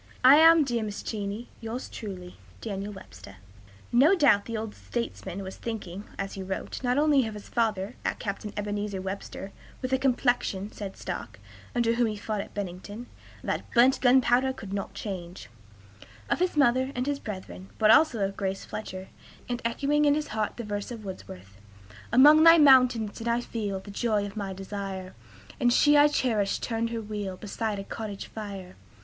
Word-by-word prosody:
I 265 +3 +9
am, 325 0 +7
dear 240 -4 -1
Mrs. 210 -1 -6
Cheney, 210 +2 -4
yours 230 +3 -5
truly, 185 -4 -8 0.2
"DANIEL 200 - -5
WEBSTER." 145 - -12 0.6
No 280 +11 +6
doubt 280 - +4
the 230 -1 -4
old 215 -1 -5
statesman 200 -5 -5
was 190 0 -8
thinking, 205 -4 -6
as 195 0 -4
he 195 - -6
wrote, 190 0 -5
not 250 0 +1
only 290 -5 +4
of 215 - -6
his 210 - -10
father, 220 -2 -1 0.2
Captain 210 0 -5
Ebenezer 205 -1 -3
Webster 195 +1 -6 0.3
("with 255 0 -3
a 265 - +3
complexion," 245 -6 0
said 200 -2 -7
Stark, - - -6 0.4
under 235 -1 +2
whom 235 0 +2
he 215 - -3
fought 210 0 -3
at - - -11
Bennington, 205 +4 -6 0.4
"that - - -3
burnt 255 +3 +5
gunpowder 255 0 +4
could 205 -7 -8
not 195 0 -4
change"), 185 -3 -6 0.8
of - - +2
his 360 -3 0
mother 260 -1 +3
and 250 +1 -1
his 285 0 -1
brethren, 190 -3 -8
but 215 -1 +5
also 245 -8 +5
of 195 0 -4
Grace 195 0 -3
Fletcher, 190 -3 -7 0.4
and 245 0 -3
echoing 285 +5 +1
in 290 0 +4
his 305 0 -3
heart 215 0 -2
the 240 - -4
verse 205 -1 -4
of 230 -4 -8
Wordsworth: 100 - -9 0.5
"Among 295 +6 +8
thy 330 0 +9
mountains 255 -7 +5
did 230 - -5
I 235 0 +2
feel 210 -5 -3
The 200 - -11
joy 210 -1 0
of 200 - -8
my 200 -2 -4
desire; 195 -1 -6 0.5
And 240 - +3
she 295 +4 +5
I 290 0 +7
cherished 225 -9 0
turned 230 -1 -1
her 230 -1 -3
wheel 205 -3 -5
Beside 210 +1 -3
a 195 - -5
cottage 205 -1 -6
fire. 200 -4 -8
215 Hz, 180 wpm, -27 LUFS, 195-250 Hz, 0.8 s, I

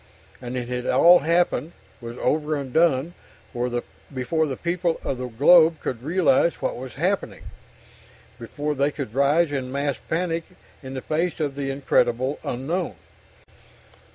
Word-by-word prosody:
And 125 0 -5
it 120 -1 -4
had 125 0 -4
all 175 +1 +6
happened, 165 -1 +1 0.3
was 120 +1 -8
over 155 0 0
and 140 -3 -5
done, 160 -1 +2 0.4
before 125 +5 -3
the 135 - -4
people 170 -1 -1
of 130 - -3
the 125 - -3
globe 160 +7 +5
could 120 -3 -4
realize 170 +1 +2
what - - -3
was 125 -1 -8
happening, - - -2 1.0
before 145 +6 -3
they 140 +1 +1
could 140 -7 -6
rise 145 +4 +3
in 130 -3 -3
mass 140 -1 -1
panic 165 -1 -1 0.4
in 135 -1 -8
the 130 - -4
face 165 +5 -1
of 145 -3 -1
the 140 0 -4
incredible 135 -1 +1
unknown. 150 - -3
140 Hz, 145 wpm, -24 LUFS, 130-165 Hz, 1.0 s, all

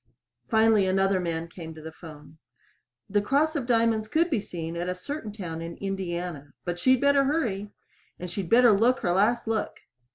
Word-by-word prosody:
Finally 220 -3 +4
another 195 0 +2
man 165 -2 -3
came 165 -1 -9
to 155 - -11
the 160 - -7
phone. 155 -1 -13 0.7
"The 205 +1 +1
Cross 290 +9 +1
of 270 -5 -2
Diamonds" 225 -2 +2
could 330 +8 +1
be 240 -8 +1
seen 165 -3 -6
at 175 +1 -3
a 180 - -2
certain 225 +3 -6
town 170 -6 -6
in 165 0 -7
Indiana. 175 -6 -4
But 175 0 -3
she'd 260 +5 +4
better 280 -1 +4
hurry! 230 -9 -1 0.5
And 180 - -6
she'd 180 0 -5
better 240 0 +6
look 230 +5 +3
her 175 - +1
last 220 +6 +2
look. 225 -1 -2
195 Hz, 185 wpm, -26 LUFS, 175-235 Hz, 0.7 s, better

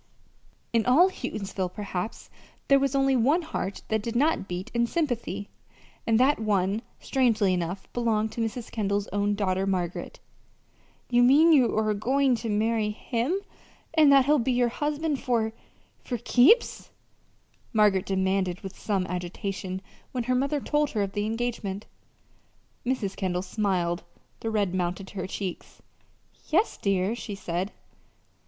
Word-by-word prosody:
In 230 -1 +3
all 340 +10 +6
Houghtonsville, 195 - -4
perhaps, 200 0 -5 0.4
there 275 0 +6
was 275 0 0
only 270 -1 +3
one 285 +9 +3
heart 200 - -4
that 220 -1 +1
did 230 +2 -4
not 290 -5 +2
beat 180 0 -5
in 235 0 +2
sympathy, 235 - -2 0.6
and 225 0 +4
that 270 +1 +4
one, 205 -1 +1 0.2
strangely 230 -7 +2
enough, 180 +2 -3
belonged 220 -2 0
to 235 - -4
Mrs. 225 +1 -4
Kendall's 205 -2 -1
own 205 0 0
daughter, 190 -1 0
Margaret. 180 -3 -2 0.9
"You 240 0 +5
mean 295 +7 +6
you 255 -7 +4
are 215 -1 +2
goin' 260 +6 +2
to 225 0 -4
marry 215 +1 +1
him, 240 - -2 0.5
and 310 -3 +6
that 275 -2 +6
he'll 295 +1 +4
be 255 +2 0
your 245 -1 +2
husband 295 +2 -2
for 225 -3 0 0.5
for 245 - -3
keeps?" 255 - +4 0.8
Margaret 210 -4 +3
demanded 190 -1 0
with 195 -1 -9
some 195 -3 0
agitation, 185 +1 -4 0.3
when 250 -2 -1
her 255 +2 0
mother 275 +3 +1
told 295 +1 +1
her 210 -3 0
of 195 - -3
the 205 +1 -2
engagement. 220 -3 -3 1.0
Mrs. 245 -6 -1
Kendall 180 -2 -1
smiled. 185 -4 -1 0.4
The 225 - -3
red 205 -4 0
mounted 185 +1 -2
to 205 - -12
her 185 0 -3
cheek. 190 -1 -4 0.9
"Yes, 375 +8 +2
dear," 195 +1 +1
she 215 -3 -6
said. 185 +1 -3
220 Hz, 145 wpm, -27 LUFS, 195-255 Hz, 1.0 s, all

